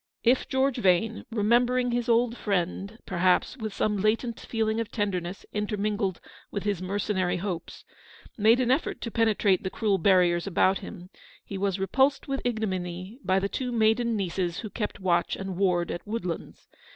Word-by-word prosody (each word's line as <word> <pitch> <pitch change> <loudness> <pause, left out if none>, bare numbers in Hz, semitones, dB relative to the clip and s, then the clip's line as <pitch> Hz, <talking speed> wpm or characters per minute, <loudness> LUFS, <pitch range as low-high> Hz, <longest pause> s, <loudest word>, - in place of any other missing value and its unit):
If 245 +2 +3
George 265 0 +1
Vane 215 +1 +2
— - - -54
remembering 240 +3 +2
his 240 0 -1
old 235 0 +3
friend, 200 0 -2
perhaps, 180 +1 +2
with 220 -5 -5
some 210 +1 0
latent 225 +3 0
feeling 220 -1 -1
of 230 -1 -2
tenderness 195 -4 -3
intermingled 210 -2 -1 0.3
with 200 - -4
his 200 -4 -1
mercenary 190 -1 -1
hopes 180 -3 -5 0.3
— - - -21
made 225 +3 +4
an 250 -1 +2
effort 270 +5 0
to 230 - -4
penetrate 215 -4 +2
the 190 - -3
cruel 200 -1 0
barriers 175 -1 +3
about 190 +1 +3
him, 190 -2 -10 0.3
he 200 - -7
was 195 0 0
repulsed 265 +8 +1
with 275 -1 -2
ignominy 190 -2 -3
by 190 - +2
the 195 +1 +1
two 250 +4 -3
maiden 230 +1 +2
nieces 180 -3 -2
who 215 - -7
kept 210 -3 -4
watch 175 -2 +1
and 195 -1 -5
ward 175 -2 +1
at 175 - -6
Woodlands. 210 -6 -5
205 Hz, 170 wpm, -27 LUFS, 185-230 Hz, 0.3 s, made